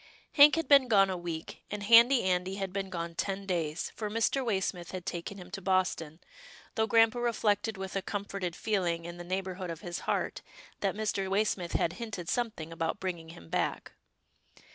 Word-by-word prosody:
Hank 295 Hz, 0 st, +8 dB
had 330 Hz, 0 st, -1 dB
been 275 Hz, -3 st, +7 dB
gone 195 Hz, -4 st, +4 dB
a -, -, -2 dB
week, 170 Hz, -2 st, -6 dB
and 205 Hz, 0 st, -4 dB
Handy 235 Hz, +4 st, +7 dB
Andy 185 Hz, 0 st, 0 dB
had 195 Hz, -2 st, -4 dB
been 195 Hz, -1 st, -3 dB
gone 170 Hz, -2 st, -4 dB
ten 195 Hz, +3 st, -3 dB
days, 170 Hz, -4 st, -2 dB
for 215 Hz, -2 st, -3 dB
Mr. 230 Hz, +5 st, +1 dB
Waysmith 190 Hz, -6 st, -2 dB
had 185 Hz, -2 st, -5 dB
taken 190 Hz, +1 st, -5 dB
him 180 Hz, -1 st, -11 dB
to 200 Hz, -1 st, -5 dB
Boston, 180 Hz, -4 st, 0 dB, 0.5 s
though 220 Hz, 0 st, +1 dB
grampa 225 Hz, +2 st, +4 dB
reflected 220 Hz, -2 st, 0 dB
with 190 Hz, 0 st, -6 dB
a 195 Hz, -, 0 dB
comforted 195 Hz, -3 st, -4 dB
feeling 175 Hz, -6 st, -1 dB
in 170 Hz, 0 st, -7 dB
the 175 Hz, -, -7 dB
neighbourhood 185 Hz, 0 st, -3 dB
of 165 Hz, -1 st, -6 dB
his 175 Hz, -1 st, -5 dB
heart, -, -, -1 dB, 0.4 s
that 195 Hz, -1 st, 0 dB
Mr. 200 Hz, -3 st, -1 dB
Waysmith 195 Hz, -3 st, 0 dB
had 170 Hz, -, +1 dB
hinted 200 Hz, -7 st, -5 dB
something 215 Hz, -10 st, -2 dB
about 165 Hz, +4 st, -2 dB
bringing 175 Hz, -3 st, -4 dB
him 85 Hz, -, -12 dB
back. -, -, -2 dB
190 Hz, 185 wpm, -30 LUFS, 175-210 Hz, 0.5 s, Hank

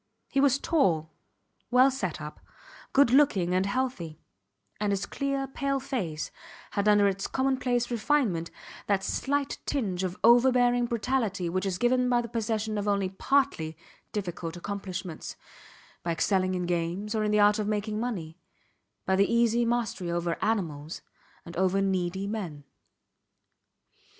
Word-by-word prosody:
He 275 Hz, -, 0 dB
was 275 Hz, -1 st, +4 dB
tall, 170 Hz, -, +1 dB, 0.6 s
well 255 Hz, +3 st, +5 dB
set 190 Hz, -11 st, -3 dB
up, 150 Hz, 0 st, -8 dB, 0.5 s
good 270 Hz, -3 st, +5 dB
looking 230 Hz, -11 st, +4 dB
and 185 Hz, +1 st, +2 dB
healthy; 200 Hz, -, -2 dB, 0.6 s
and 210 Hz, -1 st, 0 dB
his 200 Hz, 0 st, -1 dB
clear 275 Hz, +3 st, -2 dB
pale 275 Hz, +1 st, -2 dB
face 190 Hz, -, -3 dB, 0.4 s
had 200 Hz, +1 st, 0 dB
under 205 Hz, -1 st, +5 dB
its 195 Hz, 0 st, -1 dB
commonplace 255 Hz, -2 st, 0 dB
refinement 225 Hz, -, +1 dB, 0.4 s
that 195 Hz, -2 st, +1 dB
slight 285 Hz, +5 st, -1 dB
tinge 195 Hz, -10 st, -1 dB
of 185 Hz, +1 st, -3 dB
overbearing 245 Hz, +1 st, +5 dB
brutality 225 Hz, -6 st, -1 dB
which 185 Hz, +3 st, -1 dB
is 185 Hz, -2 st, -1 dB
given 250 Hz, +3 st, +2 dB
by 245 Hz, -1 st, +3 dB
the 235 Hz, -, -3 dB
possession 220 Hz, -1 st, -2 dB
of 205 Hz, -, -3 dB
only 200 Hz, -2 st, +1 dB
partly 190 Hz, -, 0 dB, 0.3 s
difficult 175 Hz, -4 st, -4 dB
accomplishments; 185 Hz, -3 st, -5 dB, 0.7 s
by 170 Hz, -, -1 dB
excelling 185 Hz, +1 st, +1 dB
in 180 Hz, -, -1 dB
games, 175 Hz, +5 st, -2 dB
or 215 Hz, -1 st, 0 dB
in 210 Hz, -, +1 dB
the 210 Hz, 0 st, +3 dB
art 205 Hz, +1 st, +5 dB
of 210 Hz, -, -1 dB
making 210 Hz, 0 st, -1 dB
money; 185 Hz, -9 st, -4 dB, 0.7 s
by 190 Hz, -, +2 dB
the 200 Hz, +3 st, +3 dB
easy 235 Hz, 0 st, +3 dB
mastery 230 Hz, -7 st, -1 dB
over 170 Hz, 0 st, -1 dB
animals 165 Hz, -8 st, -2 dB, 0.4 s
and 170 Hz, -, -9 dB
over 190 Hz, +1 st, +2 dB
needy 190 Hz, -1 st, 0 dB
men. 185 Hz, -9 st, -5 dB
205 Hz, 145 wpm, -28 LUFS, 180-245 Hz, 0.7 s, well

